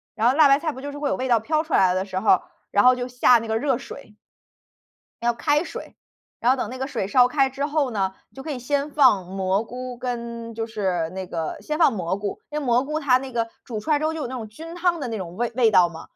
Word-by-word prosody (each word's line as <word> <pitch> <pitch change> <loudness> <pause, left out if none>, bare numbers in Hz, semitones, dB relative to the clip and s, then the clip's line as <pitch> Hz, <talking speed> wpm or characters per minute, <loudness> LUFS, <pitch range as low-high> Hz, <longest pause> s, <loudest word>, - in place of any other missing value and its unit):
然 230 +2 +3
后 - - +3
辣 300 0 +6
白 275 +1 +5
菜 315 -1 -2
不 260 - -10
就 285 +1 -6
是 - - -7
会 290 -2 -1
有 - - 0
味 260 +1 -2
道 235 -3 +3
飘 310 +6 +1
出 315 - -7
来 185 -1 +4
的 185 +1 -1
时 185 -1 -3
候， 190 -4 +4 0.3
然 205 +3 +3
后 255 0 +7
就 245 0 -3
下 245 0 +5
那 225 0 -7
个 220 - +1
热 270 -3 +1
水。 270 -5 -11 1.1
要 240 0 +2
开 295 +6 +1
水。 - - -8 0.5
然 245 +2 +4
后 - - 0
等 245 - -3
那 255 - -7
个 265 - -2
水 195 -8 -3
烧 245 +3 +5
开 270 +1 +2
之 280 +2 -2
后 290 -3 0
呢， 195 -3 -1 0.2
就 270 - -10
可 315 - -5
以 255 - -4
先 285 +3 -1
放 245 -11 +4
蘑 190 +3 -1
菇 250 +1 -7
跟 235 -2 -5
就 225 0 -3
是 180 -6 -1
那 190 0 -6
个 165 -3 -4
先 305 +9 -3
放 320 -6 +5
蘑 185 -3 -2
菇。 200 0 -4
那 300 0 -3
蘑 250 -1 +2
菇 305 +2 -3
它 255 -4 +4
那 265 -1 -8
个 230 -1 -1 0.2
煮 220 -4 -5
出 315 - -6
来 295 - +4
之 310 - -3
后 320 +1 0
就 320 - -5
有 - - -2
那 260 - -6
种 225 -4 -6
菌 325 +10 -10
汤 350 -1 +1
的 255 - -3
那 225 -2 -3
种 175 -2 -7
味 240 0 -1
味 230 -3 +4
道 180 -3 +6
嘛， 165 -1 -10
245 Hz, 295 characters per minute, -23 LUFS, 210-280 Hz, 1.1 s, 后